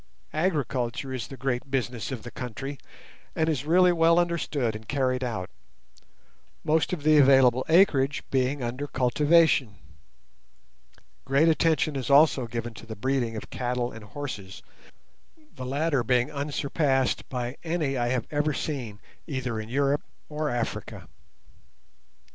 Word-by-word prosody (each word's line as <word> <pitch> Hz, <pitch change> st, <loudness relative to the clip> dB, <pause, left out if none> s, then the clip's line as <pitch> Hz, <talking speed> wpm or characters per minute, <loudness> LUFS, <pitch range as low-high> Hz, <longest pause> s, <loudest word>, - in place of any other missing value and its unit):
Agriculture 140 Hz, -6 st, -1 dB
is 125 Hz, -4 st, -4 dB
the 135 Hz, -, -10 dB
great 135 Hz, 0 st, -2 dB
business 125 Hz, -2 st, -2 dB
of 125 Hz, -4 st, -5 dB
the 120 Hz, -, -8 dB
country, 130 Hz, +3 st, -6 dB, 0.6 s
and 160 Hz, -, +1 dB
is 145 Hz, -4 st, -1 dB
really 180 Hz, +2 st, +5 dB
well 165 Hz, 0 st, +4 dB
understood 155 Hz, -9 st, 0 dB
and 110 Hz, +1 st, -9 dB
carried 130 Hz, -2 st, 0 dB
out, 110 Hz, -7 st, -3 dB, 1.2 s
most 155 Hz, +1 st, +1 dB
of 170 Hz, -5 st, -3 dB
the 155 Hz, 0 st, +5 dB
available 130 Hz, -2 st, +5 dB
acreage 150 Hz, -5 st, +4 dB
being 130 Hz, +1 st, 0 dB
under 125 Hz, +5 st, -3 dB
cultivation. 140 Hz, -2 st, +3 dB, 1.5 s
Great 140 Hz, +4 st, +3 dB
attention 160 Hz, -2 st, +2 dB
is 130 Hz, -2 st, -3 dB
also 140 Hz, -3 st, +5 dB
given 115 Hz, 0 st, -5 dB
to 115 Hz, -, -12 dB
the 110 Hz, -, -6 dB
breeding 125 Hz, 0 st, -1 dB
of 110 Hz, -, -8 dB
cattle 125 Hz, -1 st, -2 dB
and 115 Hz, -, -10 dB
horses, 105 Hz, -6 st, -7 dB, 0.9 s
the 130 Hz, -, -7 dB
latter 145 Hz, -1 st, 0 dB
being 125 Hz, +3 st, +1 dB
unsurpassed 140 Hz, -1 st, 0 dB
by 125 Hz, 0 st, -3 dB
any 160 Hz, -5 st, -1 dB
I 120 Hz, -2 st, 0 dB
have 125 Hz, -1 st, -1 dB
ever 150 Hz, 0 st, 0 dB
seen 120 Hz, -9 st, -4 dB, 0.3 s
either 130 Hz, -6 st, -3 dB
in 110 Hz, +1 st, -7 dB
Europe 140 Hz, +3 st, +1 dB, 0.3 s
or 150 Hz, 0 st, -2 dB
Africa. 120 Hz, -1 st, -4 dB
135 Hz, 135 wpm, -26 LUFS, 120-150 Hz, 1.5 s, really